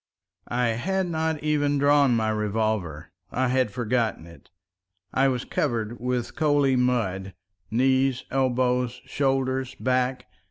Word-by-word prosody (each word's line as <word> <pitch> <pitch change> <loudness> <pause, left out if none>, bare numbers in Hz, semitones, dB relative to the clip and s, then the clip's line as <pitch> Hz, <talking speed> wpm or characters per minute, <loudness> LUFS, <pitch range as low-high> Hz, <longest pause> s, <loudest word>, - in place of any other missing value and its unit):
I 120 0 0
had 190 +12 -1
not 160 -2 -2
even 145 -1 +1
drawn 140 -2 +4
my 110 -1 +1
revolver—I 105 - -2
had 130 -2 +2
forgotten 115 -4 -1
it. 85 0 -16 0.6
I 135 +1 +3
was 125 -2 -1
covered 120 -4 -2
with 125 -1 -2
coaly 145 -4 +2
mud—knees, 115 +3 0
elbows, 125 -2 +1
shoulders, 130 -2 -1
back. 125 0 0
125 Hz, 110 wpm, -25 LUFS, 110-135 Hz, 0.6 s, drawn